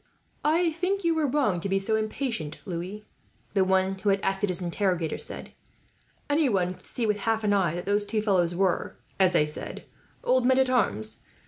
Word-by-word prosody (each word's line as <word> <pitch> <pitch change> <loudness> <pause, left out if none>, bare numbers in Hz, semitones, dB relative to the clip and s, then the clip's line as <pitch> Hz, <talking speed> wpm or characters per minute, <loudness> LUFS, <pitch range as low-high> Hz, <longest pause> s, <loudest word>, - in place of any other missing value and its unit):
"I 330 +3 +3
think 365 +5 -1
you 335 -1 +2
are 300 - +2
wrong 250 -10 +1
to 195 - -4
be 195 - +2
so 195 +3 0
impatient, 220 - -3
Louis," 190 +3 -5 0.5
the 195 -2 +4
one 190 0 +2
who 205 - 0
had 195 0 +3
acted 195 +1 0
as 180 - +2
interrogator 180 -2 -1
said. - - -1 0.8
"Anyone 235 - +2
could - - -13
see, 240 - 0
with 210 -1 0
half 225 +1 0
an 205 -1 +2
eye, 180 -5 +2
that 175 - -5
those 205 +1 +1
two 210 +1 -2
fellows 180 -5 +2
were, 190 0 0 0.2
as 185 -2 +4
they 150 - +4
said, 150 - -7 0.4
old 255 0 +3
men 260 +1 +4
at 260 -1 +3
arms. 110 - 0
200 Hz, 195 wpm, -27 LUFS, 185-250 Hz, 0.8 s, the